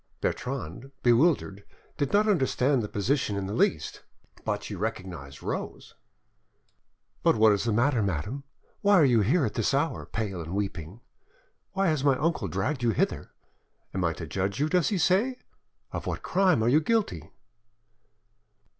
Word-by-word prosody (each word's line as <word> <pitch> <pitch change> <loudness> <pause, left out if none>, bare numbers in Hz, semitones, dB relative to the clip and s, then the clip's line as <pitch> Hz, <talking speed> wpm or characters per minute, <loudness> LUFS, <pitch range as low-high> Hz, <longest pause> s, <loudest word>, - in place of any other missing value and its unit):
Bertrande, 125 - -4
bewildered, 120 - +3 0.3
did 145 -3 -1
not 210 +1 +3
understand 135 - +2
the 105 - -3
position 110 +1 0
in 100 - -2
the 100 - -4
least, 80 -8 0 0.4
but - - -2
she - - -6
recognised 70 -7 -5
Rose— - - -5 1.3
"But - - +4
what 110 0 +5
is 100 +2 0
the 115 - +1
matter, 120 +3 +2
madame? 100 - -2 0.4
Why 205 0 +5
are 165 -6 +6
you 120 -4 +4
here 135 - +2
at 105 - -3
this 115 +4 0
hour, 145 +4 -1
pale 100 -6 -3
and 85 +3 -5
weeping? 95 0 -4 0.7
Why 195 0 +1
has 155 -4 0
my 140 -2 +3
uncle 160 +4 0
dragged 140 -2 -2
you 120 - +2
hither? 110 - -1 0.6
I 95 - -2
am 85 -2 +1
to 85 - -6
judge 95 - -2
you, 150 +2 +1
does 180 -2 +2
he 205 - 0
say? 205 +9 +2 0.5
Of - - -5
what - - -3
crime 180 -11 +2
are - - +2
you 150 +5 +4
guilty?" 160 - -1
120 Hz, 165 wpm, -27 LUFS, 100-155 Hz, 1.3 s, are